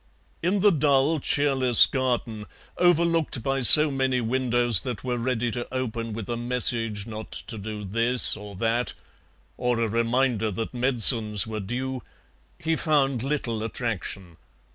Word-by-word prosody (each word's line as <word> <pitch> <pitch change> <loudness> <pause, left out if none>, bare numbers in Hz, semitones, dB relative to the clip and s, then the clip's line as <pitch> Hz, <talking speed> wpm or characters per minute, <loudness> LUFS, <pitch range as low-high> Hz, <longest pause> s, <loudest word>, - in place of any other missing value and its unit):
In 185 +4 -1
the 205 0 +4
dull, 145 0 0
cheerless 135 -4 +3
garden, 120 -5 -4 0.3
overlooked 165 -7 0
by 135 +1 -2
so 150 +6 +9
many 130 -1 -1
windows 120 -2 +2
that 125 -5 -7
were 125 -1 -4
ready 120 -1 -3
to 120 0 -7
open 115 -3 -5
with 110 -2 -8
a 120 - -4
message 115 -3 -2
not 110 -1 -10
to 110 -2 -6
do 105 +1 -8
this 115 +5 +2
or 105 -1 -11
that, 115 +5 -2 0.6
or 125 -1 -2
a 115 - -1
reminder 115 0 -1
that 115 +5 -6
medicines 115 -4 +5
were 110 -1 -6
due, 125 +5 -6 0.6
he 165 -1 -2
found 140 -6 -1
little 130 -5 -4
attraction. 100 -6 -6
120 Hz, 140 wpm, -23 LUFS, 115-135 Hz, 0.6 s, so